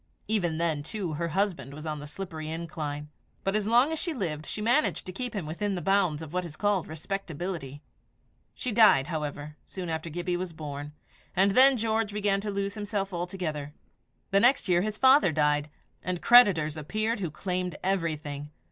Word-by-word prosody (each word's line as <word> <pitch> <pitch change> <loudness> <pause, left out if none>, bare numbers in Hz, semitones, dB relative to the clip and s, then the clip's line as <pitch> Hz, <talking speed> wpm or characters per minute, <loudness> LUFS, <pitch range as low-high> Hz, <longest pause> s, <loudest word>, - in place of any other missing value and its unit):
Even 180 -7 0
then, 160 -3 0
too, 175 +1 -4
her 170 +3 -2
husband 180 -5 -1
was 155 +1 -8
on 155 -1 -3
the 145 - -8
slippery 160 -2 -6
incline; 155 -3 -5 0.3
but 195 +1 0
as 210 -1 0
long 245 +7 +4
as 320 - -1
she 335 -4 -2
lived, 155 - -3
she - - -4
managed 240 +8 +2
to 185 - -5
keep 245 +5 -5
him 190 -6 -3
within 195 +6 -2
the - - -2
bounds 185 -5 +1
of 160 0 -10
what 180 0 0
is 165 -4 -8
called 205 -2 0
respectability. 160 -3 -5 0.7
She 250 - -2
died, 215 -11 +6
however, 150 -1 -5
soon 180 -3 -6
after 160 +1 -3
Gibbie 175 +2 -2
was 180 -1 -4
born; 150 -1 -6 0.4
and 195 +2 +4
then 260 +5 +7
George 220 -1 0
began 205 -1 +1
to 210 - -3
lose 200 0 -2
himself 205 -2 -3
altogether. 170 -5 -4 0.6
The 195 - +5
next 245 +1 +4
year 175 -1 +4
his 215 +2 -2
father 265 - +6
died, 150 -1 +1 0.3
and 180 -1 -2
creditors 180 -12 +6
appeared 215 +9 -1
who 180 -4 -2
claimed 180 +1 -2
everything. 155 -6 -2
180 Hz, 185 wpm, -28 LUFS, 155-205 Hz, 0.7 s, then